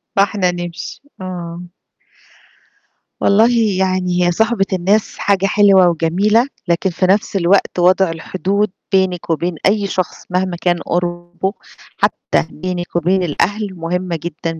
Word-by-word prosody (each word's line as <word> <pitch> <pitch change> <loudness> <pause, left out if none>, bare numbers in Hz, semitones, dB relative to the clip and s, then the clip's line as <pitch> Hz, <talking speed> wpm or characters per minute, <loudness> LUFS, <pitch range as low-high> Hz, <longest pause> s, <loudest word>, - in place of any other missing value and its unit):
فإحنا 200 -2 +2
نمشي، 175 -1 -6 0.2
آه. 175 -2 -6 1.6
والله 215 +4 +4 0.3
يعني 185 -1 +1
هي 175 - +3
صُحبة 220 +2 +1
الناس 195 +4 +1
حاجة 195 -1 +1
حلوة 195 -2 +5
وجميلة، 190 - +2 0.2
لكن 175 +2 +1
في 180 +1 -1
نَفْس 200 +2 +1
الوقت 190 0 +2
وضع 185 +1 +4
الحدود 185 +5 -2 0.2
بينِك 190 -3 +1
وبين 170 +2 -1
أي 200 0 +2
شخص 185 -2 -3
مهما 180 -1 -1
كان 175 -1 +1
قُربه، 175 +2 -2 0.4
حتّى - - 0
بينِك 175 +1 -5
وبين 180 +3 +2
الأهل 205 +6 0
مهمة 175 +1 -3
جدًا، 165 -1 -4
185 Hz, 125 wpm, -17 LUFS, 175-195 Hz, 1.6 s, حلوة